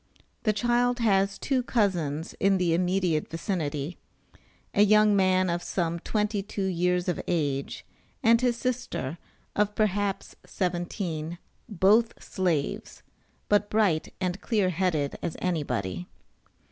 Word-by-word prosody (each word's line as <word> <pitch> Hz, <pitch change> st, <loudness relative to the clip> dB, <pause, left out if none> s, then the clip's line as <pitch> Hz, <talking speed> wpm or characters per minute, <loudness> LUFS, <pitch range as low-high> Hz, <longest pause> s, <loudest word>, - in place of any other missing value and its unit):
The 215 Hz, -, +2 dB
child 240 Hz, +3 st, +1 dB
has 195 Hz, -4 st, +2 dB
two 265 Hz, -2 st, 0 dB
cousins 175 Hz, -, 0 dB
in 195 Hz, 0 st, +3 dB
the 175 Hz, -2 st, +1 dB
immediate 180 Hz, -2 st, +1 dB
vicinity; 160 Hz, -3 st, -3 dB, 0.7 s
a -, -, +3 dB
young 210 Hz, 0 st, +5 dB
man 185 Hz, -1 st, +3 dB
of 170 Hz, 0 st, -1 dB
some 170 Hz, -2 st, -2 dB
twenty 210 Hz, +2 st, -1 dB
two 200 Hz, 0 st, -4 dB
years 180 Hz, 0 st, +1 dB
of 180 Hz, -, -1 dB
age, 145 Hz, -5 st, -1 dB, 0.4 s
and 230 Hz, 0 st, +5 dB
his 245 Hz, -2 st, +1 dB
sister, 240 Hz, -, -3 dB, 0.4 s
of 210 Hz, 0 st, +1 dB
perhaps 205 Hz, -2 st, -1 dB
seventeen 175 Hz, -2 st, -3 dB, 0.3 s
both 210 Hz, +4 st, +4 dB
Slaves, 170 Hz, -7 st, -2 dB, 0.4 s
but 205 Hz, 0 st, +2 dB
bright 200 Hz, -8 st, +1 dB
and 185 Hz, 0 st, -2 dB
clear 205 Hz, -5 st, +1 dB
headed 165 Hz, -5 st, -1 dB
as 165 Hz, -, -4 dB
anybody. 115 Hz, -, -2 dB
185 Hz, 120 wpm, -27 LUFS, 165-210 Hz, 0.7 s, young